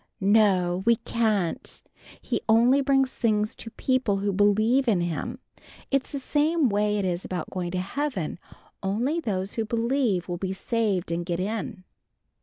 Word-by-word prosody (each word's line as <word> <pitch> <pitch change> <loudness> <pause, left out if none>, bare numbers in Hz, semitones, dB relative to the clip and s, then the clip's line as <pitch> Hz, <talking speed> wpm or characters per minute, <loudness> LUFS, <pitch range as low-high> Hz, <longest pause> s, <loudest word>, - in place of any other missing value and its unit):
"No, 190 -3 +3
we 235 - +6
can't! 220 -6 -1 0.4
He - - -1
only 240 +5 +5
brings 270 -1 +2
things 215 -2 0
to 225 - -7
people 255 -4 0
who 200 0 -1
bleeve 215 +7 +3
in 200 -6 +3
him. 175 - -3 0.5
It's 275 -1 0
the 285 - -3
same 295 +1 +1
way 210 0 +1
it 200 - -1
is 175 0 -1
about 180 -4 -5
going 180 -2 -3
to 180 +1 -2
Heaven. 195 - -3 0.4
Only 235 +12 0
those 195 - -3
who 225 - -1
bleeve 230 -4 0
will 175 -1 -3
be 190 +1 -3
saved 200 -4 -1
and 170 +1 -1
get 170 0 -3
in." 205 0 -3
210 Hz, 160 wpm, -26 LUFS, 185-245 Hz, 0.5 s, we